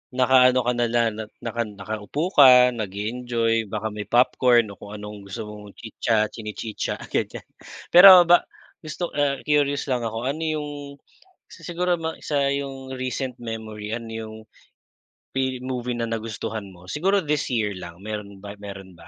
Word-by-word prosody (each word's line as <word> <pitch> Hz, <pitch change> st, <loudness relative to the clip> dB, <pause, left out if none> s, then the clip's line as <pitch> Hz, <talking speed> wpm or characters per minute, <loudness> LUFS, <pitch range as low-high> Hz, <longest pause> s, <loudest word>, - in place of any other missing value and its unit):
naka-ano 130 Hz, 0 st, +5 dB
ka 125 Hz, -, +1 dB
na 120 Hz, -1 st, 0 dB
lang, 115 Hz, 0 st, +2 dB
na -, -, -3 dB, 0.2 s
naka 115 Hz, 0 st, -2 dB
nakaupo 105 Hz, -, -4 dB
ka 125 Hz, -5 st, +8 dB
nage-enjoy, 115 Hz, +2 st, -1 dB
baka 110 Hz, +2 st, -3 dB
may 105 Hz, 0 st, -6 dB
popcorn 120 Hz, -2 st, +3 dB
o -, -, -11 dB
kung 100 Hz, -, -10 dB
anong 105 Hz, 0 st, -8 dB
gusto 110 Hz, +4 st, -6 dB
mong 105 Hz, -1 st, -12 dB
chitsa 110 Hz, -1 st, -1 dB
chinichitsa, 110 Hz, 0 st, -5 dB, 0.2 s
ganyan. -, -, -2 dB, 0.5 s
Pero 180 Hz, 0 st, +10 dB
ba 175 Hz, +1 st, +6 dB, 0.4 s
gusto 165 Hz, +2 st, -5 dB
ah, 145 Hz, -1 st, +1 dB
curious 145 Hz, -1 st, +1 dB
lang 120 Hz, -2 st, 0 dB
ako, 115 Hz, +1 st, -5 dB
ano 155 Hz, +3 st, -7 dB
yung, 155 Hz, -1 st, -2 dB, 0.8 s
isa -, -, -15 dB
siguro 180 Hz, +1 st, -1 dB
ma 160 Hz, 0 st, -4 dB
sa 140 Hz, -2 st, 0 dB
yung 135 Hz, -1 st, -4 dB
recent 130 Hz, 0 st, -4 dB
memory, 110 Hz, -2 st, -6 dB
ano 115 Hz, -1 st, -6 dB
yung 110 Hz, -1 st, -7 dB, 1.0 s
Pi-movie 130 Hz, -2 st, -2 dB
na 120 Hz, -, -2 dB
nagustuhan 110 Hz, -1 st, -4 dB
mo 90 Hz, +1 st, -11 dB
siguro 190 Hz, +5 st, +1 dB
this 150 Hz, -1 st, -1 dB
year 110 Hz, -5 st, 0 dB
lang 90 Hz, -1 st, -9 dB
meron 105 Hz, -2 st, -7 dB
ba, 100 Hz, -, -7 dB
meron 95 Hz, -2 st, -9 dB
ba? 85 Hz, -, -14 dB
120 Hz, 155 wpm, -24 LUFS, 105-135 Hz, 1.0 s, Pero